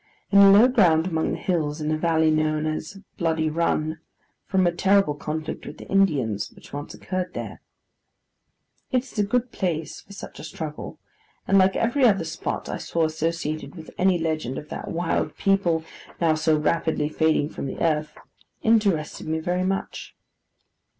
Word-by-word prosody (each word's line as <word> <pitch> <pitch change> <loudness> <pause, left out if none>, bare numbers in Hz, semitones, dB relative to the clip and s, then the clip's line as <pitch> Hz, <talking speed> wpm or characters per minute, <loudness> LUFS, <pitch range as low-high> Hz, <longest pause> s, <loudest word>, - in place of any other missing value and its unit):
In 200 - +6
a 200 0 +9
low 205 +5 +8
ground 175 -10 +4
among 160 -3 -1
the - - -2
hills, 155 -4 -1
is 155 0 -2
a - - +2
valley 160 0 +2
known 155 0 +1
as 155 +4 -4 0.2
'Bloody 160 -2 +1
Run,' 160 -1 0 0.5
from 190 -2 +2
a 175 - +3
terrible 195 -2 +3
conflict 155 +2 -5
with - - -8
the - - -11
Indians 140 - +1
which - - -16
once 145 +1 -6
occurred 185 -1 -4
there. - - -6 1.3
It 255 -1 +2
is 255 -5 -8
a - - +4
good 245 +4 0
place 165 -5 -3
for - - -19
such 200 - -9
a - - -8
struggle, 155 -1 -6 0.5
and, 195 - +5
like 190 0 +4
every 240 +4 +1
other 195 -8 +4
spot 160 +1 -4
I - - -3
saw 165 -1 0
associated 155 0 -3
with 160 -2 -10
any 185 -1 +4
legend 155 -6 -2
of 150 - -8
that - - -6
wild 165 0 -1
people 185 -5 +2 0.4
now 165 -2 +3
so 155 0 +2
rapidly 155 0 0
fading 155 -1 +1
from 140 - -5
the - - -6
earth, 155 -2 0 0.5
interested 200 -12 +1
me 160 0 0
very 180 +3 -1
much. 195 +1 -3
165 Hz, 170 wpm, -24 LUFS, 155-190 Hz, 1.3 s, a